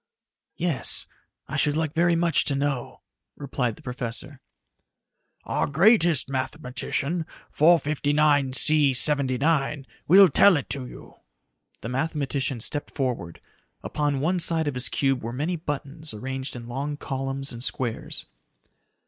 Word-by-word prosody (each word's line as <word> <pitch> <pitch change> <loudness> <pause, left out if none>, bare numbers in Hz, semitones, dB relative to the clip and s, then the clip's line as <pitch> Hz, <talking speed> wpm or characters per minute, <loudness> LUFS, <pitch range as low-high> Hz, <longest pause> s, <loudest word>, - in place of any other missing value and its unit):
"Yes, 165 -6 -1 0.4
I - - -4
should 150 0 +2
like 160 -2 -1
very 170 +1 +2
much 165 -2 +2
to 140 - 0
know," 140 -3 -3 0.4
replied 125 -5 -2
the - - -18
professor. 125 +2 -6 1.0
"Our - - -1
greatest 170 - +4
mathematician, 140 +4 -3 0.3
459C 145 -2 +3
79, 140 +1 +1 0.2
will 190 +4 +8
tell 180 +3 +5
it 140 - -5
to 135 -2 -3
you." - - -13 0.6
The 115 - -6
mathematician 135 -2 -2
stepped 145 +5 -1
forward. 120 - -4 0.4
Upon 145 -2 -1
one 180 +5 +1
side 165 -2 +4
of 145 - -1
his 125 0 -1
cube 135 -2 0
were 115 - -5
many 150 +8 -2
buttons 150 -3 -6
arranged 130 +4 -5
in 120 -1 -8
long 140 +4 -4
columns 135 0 -3
and 120 +1 -6
squares. 120 -4 -3
140 Hz, 125 wpm, -25 LUFS, 130-155 Hz, 1.0 s, will